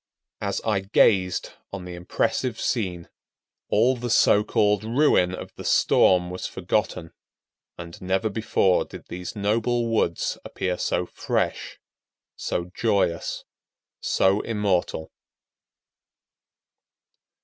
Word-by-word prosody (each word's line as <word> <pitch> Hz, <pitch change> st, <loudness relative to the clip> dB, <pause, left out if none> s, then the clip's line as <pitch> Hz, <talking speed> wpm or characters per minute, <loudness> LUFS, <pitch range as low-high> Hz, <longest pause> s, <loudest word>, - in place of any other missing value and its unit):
As -, -, -2 dB
I 105 Hz, -3 st, +1 dB
gazed 95 Hz, -2 st, +2 dB, 0.2 s
on 100 Hz, -2 st, -6 dB
the 90 Hz, -, -7 dB
impressive 110 Hz, +7 st, -1 dB
scene, 90 Hz, -8 st, -2 dB, 0.6 s
all 120 Hz, +5 st, +3 dB
the 120 Hz, 0 st, -5 dB
so 105 Hz, -2 st, +5 dB
called 105 Hz, -2 st, +2 dB
ruin 110 Hz, -7 st, +3 dB
of -, -, -9 dB
the -, -, -7 dB
storm 90 Hz, -1 st, +3 dB
was 90 Hz, -, -4 dB
forgotten, 90 Hz, -2 st, -2 dB, 0.6 s
and 85 Hz, -1 st, -9 dB
never 95 Hz, +4 st, 0 dB
before 105 Hz, -3 st, +2 dB
did -, -, -12 dB
these 90 Hz, +4 st, -6 dB
noble 115 Hz, +4 st, 0 dB
woods 95 Hz, -7 st, 0 dB
appear 90 Hz, -1 st, -3 dB
so 90 Hz, -, 0 dB
fresh, -, -, -2 dB, 0.6 s
so 85 Hz, +1 st, -3 dB
joyous, 100 Hz, -7 st, 0 dB, 0.6 s
so 95 Hz, +2 st, +2 dB
immortal. 100 Hz, -7 st, -1 dB
95 Hz, 105 wpm, -24 LUFS, 90-110 Hz, 0.6 s, so